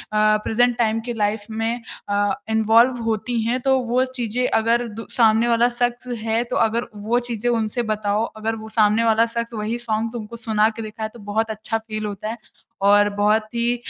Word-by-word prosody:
present 215 +3 +3
time 225 -1 +1
की 240 - -3
life 210 -1 -1
में 225 +2 -2 0.3
अ, 205 +3 +1 0.2
involve 225 +3 +4
होती 225 +2 -1
हैं 245 +3 0
तो 265 0 +3
वो 255 +2 +3
चीज़ें 245 0 -1
अगर 235 +2 +1
दु 225 +1 -8
सामने 225 0 +4
वाला 235 +1 +3
शख्स 245 0 -2 0.2
है 225 +1 +1
तो 235 - -5
अगर 230 +2 -1 0.2
वो 240 +2 +2
चीज़ें 235 +1 -1
उनसे 230 +1 0
बताओ 210 +1 0
अगर 225 +1 -2
वो 220 0 -9
सामने 215 0 +3
वाला 225 0 +4
शख्स 235 0 -3
वही 220 +2 -2
सॉन्ग 230 0 -2
उनको 235 0 -6
सुना 220 -1 +2
के 225 - -4
दिखाए 215 0 -5
तो 240 - -13
बहुत 220 +1 0
अच्छा 220 +1 -3
फ़ील 215 -1 -5
होता 205 +1 -5
है 230 - -5 0.5
और 205 0 +5
बहुत 215 +1 +3
ही 235 +1 +1
225 Hz, 190 wpm, -22 LUFS, 215-235 Hz, 0.5 s, और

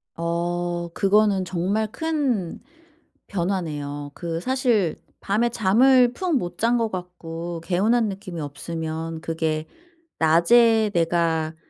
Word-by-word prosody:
어 175 +1 -2
그거는 200 -1 +3
정말 195 +5 -1
큰 275 - -1 0.7
변화네요. 150 -6 -3
그 165 0 -4
사실 240 - +1 0.3
밤에 220 +4 +1
잠을 245 +4 +4
푹 360 +2 -1
못 175 -7 -4
잔 235 +2 +2
것 225 -2 -1
같고 175 -2 -6
개운한 215 +7 +2
느낌이 190 -3 -7
없으면 160 +2 -5
그게 160 -1 -2 0.5
낮에 220 +7 +4
내가 165 -2 +1
180 Hz, 200 characters per minute, -23 LUFS, 165-220 Hz, 0.7 s, 잠을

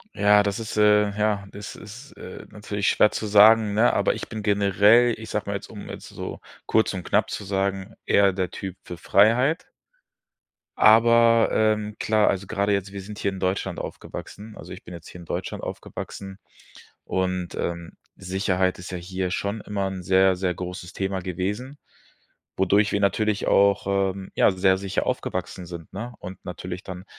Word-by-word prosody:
Ja, 105 0 +5
das 100 +2 -2
ist, 110 -1 -6
äh 105 -1 +5
ja, 105 -2 0
das 105 0 -8
ist, 120 +7 -12
äh, - - -10
natürlich 105 -1 -2
schwer 105 - +4
zu - - -4
sagen, 105 +1 +6
ne, 110 +4 +3
aber - - +2
ich - - -7
bin 110 -1 -5
generell 105 +4 +4
ich 110 0 -9
sage 105 -1 -3
mal 100 - -2
jetzt, 100 - -7
um 105 - -10
jetzt - - -8
so - - -7 0.3
kurz 110 -1 +2
und 90 -2 -5
knapp - - +1
zu - - -5
sagen, 95 +1 -2
eher 100 -1 +4
der 95 -1 -2
Typ 95 -1 -7
für 90 - -8
Freiheit. 115 - +3 1.1
Aber, 115 +1 +6
ähm, 105 -1 +1
klar, 110 -1 +2
also 95 +1 -1
gerade 100 0 -1
jetzt. 100 -1 -1
Wir 100 - -6
sind 105 +2 -9
hier 100 - -1
in 95 - -7
Deutschland 95 -1 -2
aufgewachsen 105 +1 -8
also - - -11
ich - - -11
bin 90 - -11
jetzt 85 -1 -10
hier - - -11
in 85 - -11
Deutschland - - -5
aufgewachsen 95 -1 -7 0.7
und, 90 -1 -2
ähm, 85 -1 -4 0.2
Sicherheit 95 -1 -1
ist 90 0 -9
ja 90 - -4
hier 90 +1 -4
schon 100 +4 -3
immer 100 -2 -3
'n 95 -1 -6
sehr 95 +1 +4
sehr 90 0 -1
großes 90 0 -7
Thema 95 -1 -2
gewesen, 105 - -4 0.8
wodurch 100 +3 +3
wir - - 0
natürlich 105 +1 +1
auch, 100 0 +3
ähm, 95 -1 -1
ja, - - +4
sehr 95 0 +2
sicher 95 0 -2
aufgewachsen 90 - -3
sind, 85 -2 -10
ne, 115 +5 -6
und 95 +1 -10
natürlich 90 0 -6
dann 90 -1 -8
100 Hz, 180 wpm, -24 LUFS, 95-105 Hz, 1.1 s, sagen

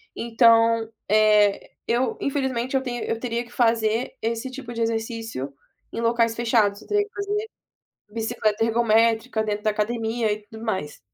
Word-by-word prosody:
então, 230 -1 +4 0.2
eh, 210 -1 +4 0.2
eu 240 +3 0
infelizmente 265 -2 -1
eu 265 - +1
tenho 240 -2 -4
eu 225 - -2
teria 235 0 -2
que 240 - -18
fazer 230 0 +1
esse 230 +3 -2
tipo 250 -2 -8
de 230 - -4
exercício 225 - -3 0.4
em 230 - -3
locais 230 -1 +2
fechados, 220 -3 +1
teria 415 0 +2
que 415 - -22
fazer 410 +2 -2 0.6
bicicleta 220 -1 0
ergométrica 225 0 +2
dentro 210 0 -3
da 215 - +3
academia 225 +1 -1
e 210 0 -5
tudo 220 +1 -10
mais. 190 -10 -3
230 Hz, 150 wpm, -24 LUFS, 220-240 Hz, 0.6 s, então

